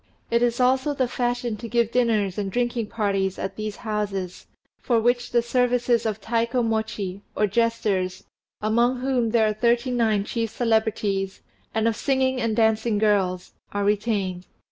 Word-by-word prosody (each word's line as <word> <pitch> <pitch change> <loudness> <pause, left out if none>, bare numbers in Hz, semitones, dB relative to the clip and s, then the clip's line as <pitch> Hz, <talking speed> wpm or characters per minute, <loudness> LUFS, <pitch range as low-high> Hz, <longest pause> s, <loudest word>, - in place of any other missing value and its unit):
It 235 0 +3
is 240 0 +1
also 260 +3 +2
the 260 -2 +1
fashion 245 -2 -2
to 230 +2 -7
give 235 -1 +1
dinners 220 -6 +1
and 195 -2 -2
drinking 240 0 -1
parties 195 -3 -1
at 190 0 -4
these 215 -1 -4
houses, 200 -4 -3 0.3
for 235 -3 +1
which 245 +2 +1
the 235 -1 +3
services 245 -1 +1
of 215 -1 -2
Taikomochi, 220 -4 -1
or 210 - +2
jesters, 205 -4 0 0.4
among 240 +4 +2
whom 255 -3 +1
there 225 -1 +3
are 215 - +1
thirty 235 +3 +1
nine 220 -4 +2
chief 225 +2 -2
celebrities, 215 -4 0 0.3
and 220 0 +2
of 225 - +1
singing 260 0 +1
and 230 -2 0
dancing 220 0 +2
girls, 195 -4 +1 0.2
are 205 0 0
retained. 200 -3 -1
225 Hz, 155 wpm, -24 LUFS, 205-240 Hz, 0.4 s, It